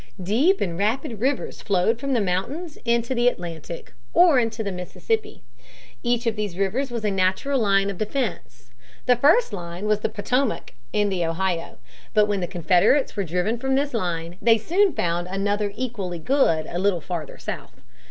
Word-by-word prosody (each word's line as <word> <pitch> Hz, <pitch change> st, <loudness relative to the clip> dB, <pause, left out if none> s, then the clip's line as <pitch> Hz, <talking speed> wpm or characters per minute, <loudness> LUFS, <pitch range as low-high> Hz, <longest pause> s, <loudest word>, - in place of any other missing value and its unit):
Deep 270 Hz, -, +3 dB
and 170 Hz, -2 st, -2 dB
rapid 225 Hz, +1 st, -1 dB
rivers 265 Hz, +3 st, -1 dB
flowed 200 Hz, +3 st, +1 dB
from 275 Hz, +1 st, -1 dB
the 240 Hz, -, +3 dB
mountains 235 Hz, -, -2 dB
into 235 Hz, +1 st, +1 dB
the 240 Hz, -1 st, +2 dB
Atlantic 170 Hz, -, -4 dB, 0.2 s
or 340 Hz, -7 st, +7 dB
into 225 Hz, -1 st, -1 dB
the 200 Hz, -, -2 dB
Mississippi. 420 Hz, -, -3 dB, 0.6 s
Each 240 Hz, -1 st, 0 dB
of 230 Hz, -2 st, +1 dB
these 205 Hz, -5 st, -3 dB
rivers 225 Hz, +8 st, 0 dB
was 235 Hz, -3 st, -4 dB
a 210 Hz, -, +2 dB
natural 195 Hz, +9 st, +1 dB
line 195 Hz, -3 st, +3 dB
of 190 Hz, -, -9 dB
defense. 215 Hz, -, -3 dB, 0.3 s
The 250 Hz, -, +5 dB
first 290 Hz, -, +4 dB
line 175 Hz, 0 st, -5 dB
was 210 Hz, -1 st, +2 dB
the -, -, -1 dB
Potomac 230 Hz, +4 st, -1 dB, 0.2 s
and 205 Hz, +3 st, +1 dB
the 180 Hz, -2 st, 0 dB
Ohio. 165 Hz, +1 st, -2 dB, 0.4 s
But 210 Hz, -1 st, +6 dB
when 205 Hz, -1 st, -1 dB
the 175 Hz, -, -2 dB
Confederates 180 Hz, -, +3 dB
were 200 Hz, -, 0 dB
driven 180 Hz, +7 st, -1 dB
from 265 Hz, +1 st, 0 dB
this 285 Hz, +1 st, 0 dB
line, 175 Hz, -5 st, -2 dB
they 230 Hz, -1 st, +5 dB
soon 365 Hz, -, +2 dB
found 175 Hz, -, -1 dB
another 205 Hz, +2 st, -1 dB
equally 210 Hz, -9 st, -3 dB
good 165 Hz, -, +2 dB
a 175 Hz, -, -4 dB
little 190 Hz, -2 st, +2 dB
farther 165 Hz, -2 st, -5 dB
south. -, -, -7 dB
210 Hz, 175 wpm, -24 LUFS, 180-250 Hz, 0.6 s, or